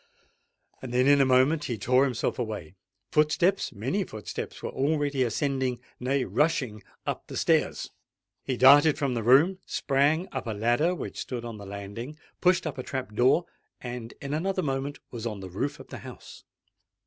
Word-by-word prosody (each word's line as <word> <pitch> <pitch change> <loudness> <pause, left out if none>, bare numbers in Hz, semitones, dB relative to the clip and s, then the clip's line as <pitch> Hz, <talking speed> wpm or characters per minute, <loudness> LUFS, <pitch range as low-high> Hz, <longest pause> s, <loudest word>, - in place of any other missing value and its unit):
Then 125 0 +1
in 140 0 +6
a - - +5
moment 130 +4 +3
he 120 - -3
tore 125 +6 +3
himself 125 -3 -2
away:—footsteps—many 115 - -1
footsteps 110 -2 -7
were - - -3
already 145 -1 0
ascending—nay, 130 0 -1
rushing 140 -9 0 0.2
up—the - - -4
stairs. - - +1 0.5
He 130 -2 -2
darted 145 +4 +7
from 140 -3 0
the 115 - -1
room, 145 - +5
sprang 145 +6 +1
up - - -4
a 110 - -1
ladder 120 - +2
which - - -6
stood 120 -2 -5
on 115 -3 -7
the 100 - -9
landing—pushed 120 - -2
up 150 -4 -4
a - - -3
trap 130 -5 -5
door—and 125 -2 -1
in 140 +1 -5
another 185 +4 -1
moment 135 +1 -2
was 115 -1 -4
on 105 -3 -5
the 95 -1 -8
roof 140 +10 -3
of - - -12
the - - -7
house. - - -11
130 Hz, 150 wpm, -27 LUFS, 115-145 Hz, 0.5 s, darted